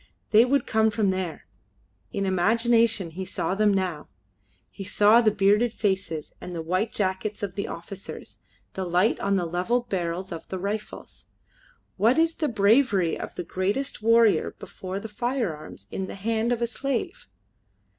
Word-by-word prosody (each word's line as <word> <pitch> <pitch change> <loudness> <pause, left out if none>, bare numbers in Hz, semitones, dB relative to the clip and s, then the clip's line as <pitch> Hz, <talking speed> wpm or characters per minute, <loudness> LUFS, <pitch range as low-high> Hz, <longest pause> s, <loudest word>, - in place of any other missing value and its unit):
They 225 +2 +7
would 275 +2 +1
come 220 0 +3
from 210 -2 +1
there. 185 -3 -4 0.7
In 200 -1 -2
imagination 225 +1 +2
he 185 +4 -5
saw 185 -1 -2
them 210 +1 +3
now. 185 -6 -1 0.6
He 195 - -8
saw 210 +4 +5
the 225 - +4
bearded 210 +3 +2
faces 190 -7 -2
and 180 - -7
the 165 - -3
white 185 +7 0
jackets 205 +1 -2
of 195 -3 -3
the 200 0 -3
officers, 195 +3 -8 0.3
the 190 - -3
light 180 +5 +2
on 200 0 +1
the 180 -2 0
levelled 185 +9 -1
barrels 180 0 -2
of 165 -1 -7
the 190 - -4
rifles. 205 +3 -6 0.7
What 225 +7 +3
is 330 0 +2
the 310 - 0
bravery 205 - +3
of - - -7
the - - -4
greatest 205 +12 -2
warrior 230 -1 +4
before 185 +1 -6
the 225 - -7
firearms 220 - -3
in 190 - -3
the - - -7
hand 225 +3 -1
of 240 -1 0
a - - +4
slave? 265 - -3
200 Hz, 165 wpm, -26 LUFS, 185-230 Hz, 0.7 s, They